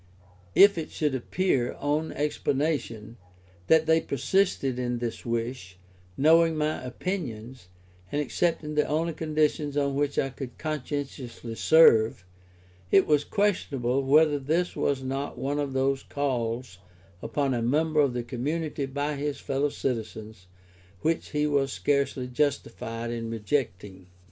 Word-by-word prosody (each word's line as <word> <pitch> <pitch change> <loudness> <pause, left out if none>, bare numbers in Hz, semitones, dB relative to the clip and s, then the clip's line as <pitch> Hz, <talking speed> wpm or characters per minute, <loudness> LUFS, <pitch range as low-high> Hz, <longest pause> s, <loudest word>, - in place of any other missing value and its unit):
If 200 -3 +7
it 155 - -5
should 150 -3 -1
appear, 130 -1 0
on 150 +2 -1
explanation, 130 -7 -2 0.5
that 160 0 +5
they 160 0 +4
persisted 140 -2 0
in 125 -1 -1
this 120 0 -5
wish, 115 -5 -3 0.4
knowing 165 +2 +5
my 155 -1 -1
opinions, 125 - -5 0.4
and 145 - 0
accepting 155 +1 -1
the 150 0 +2
only 160 +2 0
conditions 150 -2 0
on 140 -1 +1
which 145 0 -1
I 135 - +1
could 130 -1 -8
conscientiously 140 -5 -5
serve, 115 - +5 0.6
it 195 - +5
was 150 -1 +3
questionable 140 - 0
whether 145 +2 +4
this 160 +6 0
was 135 -2 0
not 135 +2 -3
one 145 +2 -2
of 140 -2 -2
those 135 +1 +1
calls 120 -6 -3 0.4
upon 140 -2 -1
a 120 - -1
member 155 +6 +1
of 140 -4 +3
the 120 - -2
community 145 +4 -3
by 145 +2 -2
his 145 0 -3
fellow 140 +2 0
citizens, 110 -7 -5 0.5
which 165 +1 0
he 150 -1 0
was 140 -2 +1
scarcely 140 -2 0
justified 120 -3 -2
in 115 -1 -4
rejecting. 105 -5 -3
140 Hz, 135 wpm, -27 LUFS, 120-150 Hz, 0.6 s, If